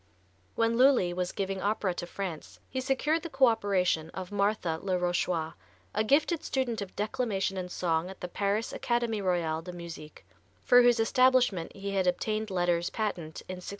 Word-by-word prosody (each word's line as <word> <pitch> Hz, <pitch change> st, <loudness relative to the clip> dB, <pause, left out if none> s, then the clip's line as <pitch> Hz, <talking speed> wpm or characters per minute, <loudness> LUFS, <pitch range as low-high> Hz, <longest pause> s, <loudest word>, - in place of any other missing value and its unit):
When 230 Hz, +1 st, +1 dB
Lully 255 Hz, -10 st, +5 dB
was 180 Hz, 0 st, -2 dB
giving 195 Hz, -1 st, -3 dB
opera 200 Hz, -1 st, 0 dB
to 175 Hz, -, -5 dB
France 175 Hz, -5 st, -6 dB
he 260 Hz, -, -3 dB
secured 290 Hz, +5 st, +1 dB
the 335 Hz, -, -6 dB
co 270 Hz, -2 st, +4 dB
operation 190 Hz, -8 st, +1 dB
of 185 Hz, 0 st, -6 dB
Marthe 205 Hz, 0 st, 0 dB, 0.2 s
le 185 Hz, -2 st, 0 dB
Rochois, 175 Hz, -2 st, -1 dB, 0.4 s
a 215 Hz, -, +1 dB
gifted 300 Hz, +7 st, +2 dB
student 245 Hz, -5 st, -1 dB
of 195 Hz, -2 st, -7 dB
declamation 205 Hz, -3 st, -1 dB
and 180 Hz, -1 st, -4 dB
song 170 Hz, -1 st, 0 dB
at 190 Hz, -, -10 dB
the 180 Hz, -, -5 dB
Paris 200 Hz, +4 st, -1 dB
Académie 235 Hz, -3 st, -1 dB
Royale 170 Hz, -4 st, 0 dB
de 180 Hz, +2 st, -8 dB
Musique, 165 Hz, -, -9 dB, 0.4 s
for 245 Hz, 0 st, +7 dB
whose 245 Hz, -1 st, +4 dB
establishment 245 Hz, -6 st, +3 dB
he 200 Hz, 0 st, -5 dB
had 190 Hz, -2 st, +1 dB
obtained 215 Hz, +4 st, -1 dB
letters 175 Hz, -2 st, +1 dB
patent 175 Hz, -8 st, -4 dB
in 185 Hz, -, -5 dB
1672. 180 Hz, -, -11 dB
195 Hz, 175 wpm, -29 LUFS, 180-230 Hz, 0.4 s, for